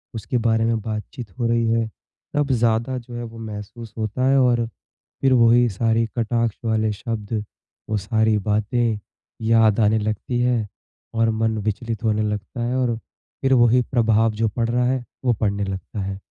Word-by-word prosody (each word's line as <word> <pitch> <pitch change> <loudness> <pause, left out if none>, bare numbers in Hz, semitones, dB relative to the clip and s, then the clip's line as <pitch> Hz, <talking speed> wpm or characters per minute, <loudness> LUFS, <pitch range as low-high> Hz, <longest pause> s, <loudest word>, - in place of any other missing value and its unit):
उसके 115 +3 -2
बारे 115 -1 +2
में 115 -1 +1
बातचीत 110 +1 -6
हो 120 - +1
रही 115 0 +2
है। 115 -1 +1 0.5
तब 145 -2 +1
ज़्यादा 115 +1 +1
जो 120 0 -9
है 120 - -4
वो 115 0 -9
महसूस 110 +1 -8
होता 110 +4 -1
है 135 - +4
और 120 -2 +3 0.5
फिर 135 -1 +4
वही 120 0 +5
सारे 115 +2 +1
कटाक्ष 115 -1 0
वाले 110 -1 +1
शब्द, 105 0 -3 0.5
वो 110 - +1
सारी 110 +1 +2
बातें 105 +2 0 0.4
याद 110 -1 +4
आने 110 0 +4
लगती 110 +3 -2
है 120 -3 +1 0.5
और 115 0 +2
मन 110 0 0
विचलित 110 +1 -3
होने 110 -1 +2
लगता 105 +3 -3
है, 120 +2 -1
और 120 -3 +1 0.4
फिर 135 0 +3
वही 120 0 +5
प्रभाव 115 -2 +3
जो 110 +1 0
पड़ 115 +2 -1
रहा 125 +1 +2
है, 130 0 0 0.2
वो 125 - +4
पड़ने 100 -1 -1
लगता 95 +2 -5
है। 95 0 -4
115 Hz, 175 wpm, -22 LUFS, 110-120 Hz, 0.5 s, वही